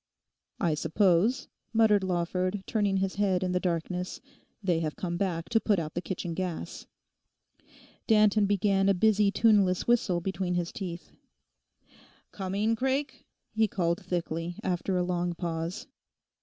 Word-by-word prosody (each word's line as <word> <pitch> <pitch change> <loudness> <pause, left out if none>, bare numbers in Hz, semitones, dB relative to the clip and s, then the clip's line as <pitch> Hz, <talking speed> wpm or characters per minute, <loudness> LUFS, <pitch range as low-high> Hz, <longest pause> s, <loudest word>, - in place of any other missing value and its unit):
'I 170 -5 +1
suppose,' 195 - +2 0.3
muttered 215 -3 +4
Lawford, 185 +2 -1
turning 205 -3 +1
his 190 0 -1
head 190 -3 +1
in 180 - -1
the 180 - +1
darkness, 180 +1 -2 0.4
'they 175 -4 +2
have 155 -2 -3
come 180 -5 -3
back 170 -3 -2
to 225 - +3
put 210 -2 +1
out 160 -2 -3
the 175 - -2
kitchen 175 -2 -4
gas.' 180 -1 -5 1.2
Danton 210 -2 +4
began 195 -1 +2
a 195 - +4
busy 210 +1 +3
tuneless 200 -3 +3
whistle 220 -7 +2
between 180 0 -2
his 175 -1 -1
teeth. 180 -4 -7 1.2
'Coming, 200 +3 -1
Craik?' 265 +3 -2 0.3
he 220 0 +3
called 170 -3 -1
thickly, 170 -1 -3
after 180 +1 -1
a 180 - +1
long 175 -1 -1
pause. 165 +1 -4
185 Hz, 140 wpm, -28 LUFS, 175-205 Hz, 1.2 s, muttered